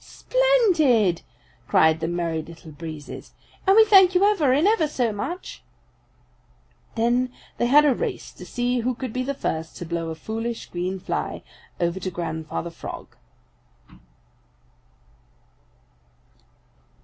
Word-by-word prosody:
"Splendid!" 340 - +2 0.5
cried 160 0 +4
the 160 - -2
Merry 170 -2 -2
Little 165 0 -12
Breezes. 155 -1 -9 0.3
"And 385 - +6
we 445 0 +8
thank 385 -3 +6
you 365 - +4
ever 390 -10 +3
and 295 +8 +3
ever 425 -8 +3
so 245 -6 -1
much!" 345 - -6 1.3
Then 240 +2 +1 0.3
they 240 - +2
had 295 +4 +6
a 285 - +4
race - - -4
to - - -12
see 245 0 -1
who 245 +2 -1
could 250 -2 -6
be 255 - -1
the 275 +2 -3
first 160 -10 -4
to 175 - -6
blow 165 0 -3
a 160 - -5
foolish 225 +7 -4
green 180 +2 -3
fly - - -4 0.4
over 170 +2 0
to 185 - -3
Grandfather 165 -1 -4
Frog. 165 - -9
230 Hz, 130 wpm, -24 LUFS, -, 1.3 s, we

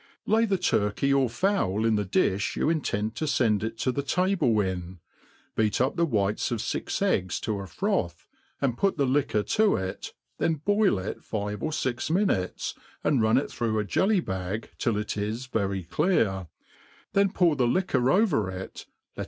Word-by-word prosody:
Lay 225 +1 +3
the 200 -3 +1
turTcey 140 - +1
or 135 -3 +3
fowl 115 - 0
in 115 - +3
the 105 - +1
difii 95 0 0
you 155 - +1
intend 110 -9 -1
to 155 - -2
fend 110 -7 +2
it 115 0 -4
to 130 - 0
the 140 - -2
table 165 - +1
in> 95 -2 -3 0.6
beat 110 -2 +1
up 130 +6 +1
the 170 -1 +2
whites 105 -5 0
of 120 - -2
fix - - -2
ecigs 95 -1 +1
to 105 -2 -2
a 100 - -6
froth, 85 0 -2 0.3
and 130 -4 -1
put 195 -4 +1
the 140 - +2
liquoc 130 -6 +1
to 215 -1 +4
it, 95 0 -5 0.3
thdi 160 -3 0
boil 205 - +3
it 95 +2 -5
fiye 105 -1 -4
or 155 - -1
fixniinutes, 140 - -1 0.3
and 135 -6 +2
run 110 +2 +4
it 135 - -1
through 115 -2 -1
a 105 - +1
jelly 190 - +2
bag 95 - -4
till 115 -3 +1
it 105 0 -3
is 110 +5 -3
very 100 -6 -2
clear, 100 - +1 0.7
then 200 0 +4
pour 175 -6 +3
the 125 -3 +2
liquor 130 -5 +1
over 165 - +2
it, 95 0 -8 0.3
let. - - -11
115 Hz, 180 wpm, -27 LUFS, 100-155 Hz, 0.7 s, to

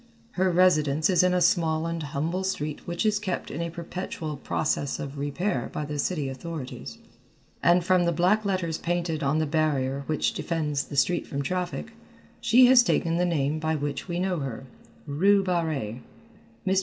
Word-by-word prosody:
Her 185 0 +1
residence 160 -3 +3
is 180 - +5
in 180 0 +3
a 180 0 +2
small 160 -2 +2
and 165 0 -3
humble 155 +6 -2
street 155 -6 -3
which 175 +4 -2
is 210 -1 +2
kept 195 -4 -3
in 155 - -4
a 170 - -2
perpetual 170 -2 -5
process 145 0 -1
of 140 0 -6
repair 145 0 -2
by 150 - -3
the 145 0 -4
city 150 -2 -1
authorities, 135 -2 -7 0.6
and 175 0 +4
from 185 -1 +3
the 170 - +2
black 180 +6 +2
letters 185 -5 -1
painted 170 -2 -1
on 140 +1 +1
the 155 - +1
barrier 140 -3 0
which 155 - 0
defends 150 -4 -2
the 140 - -7
street 175 +5 +2
from 140 0 -3
traffic, 180 +7 -3 0.5
she 235 +2 +6
has 250 0 +8
taken 170 -8 +1
the 180 - +2
name 155 -3 0
by 160 0 0
which 145 +2 -3
we 175 -1 -3
know 180 -1 0
her, 135 -2 -5 0.4
Rue 195 +7 +3
Barrée. 160 - -1 0.7
Mr. 190 0 +3
165 Hz, 180 wpm, -26 LUFS, 145-180 Hz, 0.7 s, has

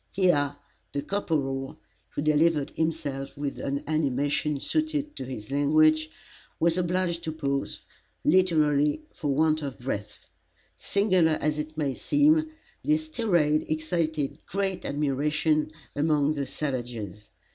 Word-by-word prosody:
Here 145 -7 +2 0.4
the 140 - -2
corporal, 135 -9 -2 0.3
who 145 - -3
delivered 155 -1 +3
himself 150 -5 -3
with 140 -1 -3
an 140 0 -2
animation 145 0 0
suited 305 - -1
to 130 - -4
his 125 -3 -7
language, 155 +2 +4 0.5
was 165 0 +3
obliged 180 -1 0
to 160 - -1
pause, 140 -3 -2 0.4
literally 155 - +3
for 150 - -4
want 155 +2 +2
of 140 -3 -5
breath. 105 -5 -5 0.5
Singular 185 -6 +2
as 150 0 0
it 155 +1 -5
may 145 -4 0
seem, 310 - +3 0.3
this 310 +1 +1
tirade 170 - +2
excited 155 -2 -1
great 190 -1 -2
admiration 150 +2 +1 0.2
among 150 0 +2
the 140 -2 -3
savages. 120 -8 -4
155 Hz, 120 wpm, -27 LUFS, 140-170 Hz, 0.5 s, language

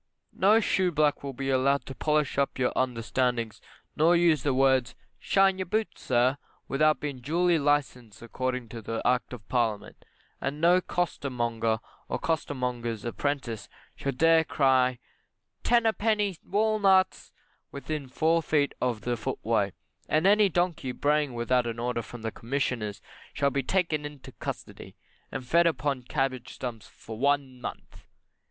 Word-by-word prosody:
No 210 +4 +5
shoeblack 170 -8 +1
will 140 -1 -5
be 135 +1 -2
allowed 135 +2 +2
to 135 - -7
polish 150 0 0
up 140 - 0
your 130 -1 +1
understandings, 120 -2 -1 0.3
nor 165 +3 +4
use 170 -4 +4
the 145 - +1
words, 130 -1 +2 0.2
"shine 195 -1 +3
your 185 - -3
boots, 215 +4 -2
sir," 130 +3 +2 0.3
without 155 +2 +2
being 145 -3 -4
duly 170 +6 +2
licensed 130 -7 -1
according 125 +1 -3
to 115 -1 -5
Act 125 0 +1
of 115 -6 -9
Parliament. 115 -5 -1 0.4
And 140 +2 -3
no 175 +3 +5
costermonger, 120 -11 -1 0.3
or - - -1
costermonger's 125 -8 -2
apprentice, 120 -2 -3 0.3
shall 140 - -2
dare 165 +4 +4
to - - -24
cry 130 -3 +3 0.6
"ten 235 -1 +3
a 225 - +4
penny 210 -3 0
walnuts," 200 -2 +2 0.4
within 140 0 -5
four 160 +5 +2
feet 145 -3 +1
of 120 -4 0
the 120 0 -1
footway; 115 - -1 0.4
and 155 +3 +2
any 205 0 +5
donkey 175 -7 -1
braying 145 -2 +1
without 120 +1 +1
an 115 -1 -4
order 120 0 -1
from 115 +1 -10
the 110 - -2
Commissioners 115 -4 -3 0.3
shall 140 -1 +1
be 140 - 0
taken 160 0 0
into 145 -2 -9
custody, - - -7 0.4
and 135 -2 -5
fed 170 +6 +4
upon 145 -5 -1
cabbage 130 -1 -2
stumps 115 -4 -6
for 110 -1 -10
one 140 -2 0
month. - - -9
135 Hz, 145 wpm, -28 LUFS, 125-160 Hz, 0.6 s, No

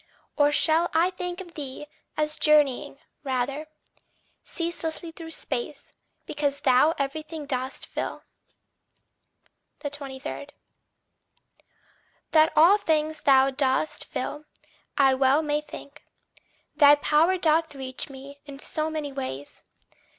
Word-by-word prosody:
Or 290 0 +4
shall 320 +3 +3
I 340 +3 +3
think 360 0 -5
of 350 -3 -12
thee 285 -2 -6 0.3
as 305 0 0
journeying, 295 -4 +3 0.3
rather, 270 +3 -2 0.8
Ceaseless 335 -2 -3
through 330 -1 -9
space, 475 +8 -5 0.3
because 285 -1 -2
thou 265 +5 +4
everything 305 +2 -4
dost 260 -1 -3
fill? - - -5 1.6
23. 280 -1 -6 1.8
That 315 0 +5
all 355 +7 +6
things 310 -3 0
thou 270 -1 +5
dost 265 +2 0
fill, 300 +1 -5 0.5
I 270 -2 +5
well 270 +3 +3
may 295 0 0
think 300 -1 -11 0.7
Thy 290 -1 +8
power 310 +5 +3
doth 320 -2 +1
reach 260 0 -6
me 275 +1 -11
in 280 -1 -9
so 310 +2 -3
many 305 -2 -4
ways. 260 - -6
295 Hz, 110 wpm, -26 LUFS, 275-315 Hz, 1.8 s, Thy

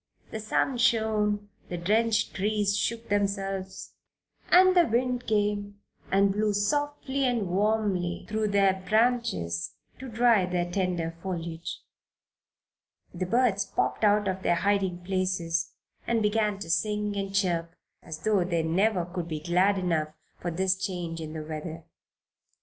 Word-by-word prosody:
The 220 - -4
sun 235 +4 0
shone, 215 -3 +1 0.2
the 175 - -3
drenched 215 +5 +1
trees 205 0 0
shook 230 +2 -2
themselves, 195 -2 -2 0.6
and 370 +1 +6
the 350 -1 +5
wind 245 +1 0
came 205 -1 0 0.3
and 195 +1 +4
blew 210 +1 0
softly 280 +5 -1
and 235 -6 0
warmly 195 -2 0
through 215 0 -1
their 195 -2 +2
branches 215 - +1 0.3
to 260 0 -7
dry 230 -4 +3
the 180 -1 0
tender 175 -3 -2
foliage. 170 -3 -5 1.3
The 180 +1 -3
birds 225 -2 +2
popped - - -2
out 205 -1 +4
of 190 0 -2
their 175 - +2
hiding 190 -1 0
places 180 -3 -1 0.4
and 230 -2 +1
began 210 -1 +1
to 165 - -6
sing 210 +2 0
and 195 -1 -3
chirp 170 -4 0 0.3
as 155 -2 -8
though 210 -4 +3
they 170 -2 0
never 180 +3 +1
could 175 -1 -5
be 155 -2 -4
glad 180 +5 +2
enough 165 -5 0 0.3
for 175 - -3
this 185 +2 +1
change 180 -4 -4
in 155 -1 -6
the 155 -1 -5
weather. 160 +1 -6
195 Hz, 140 wpm, -27 LUFS, 175-215 Hz, 1.3 s, and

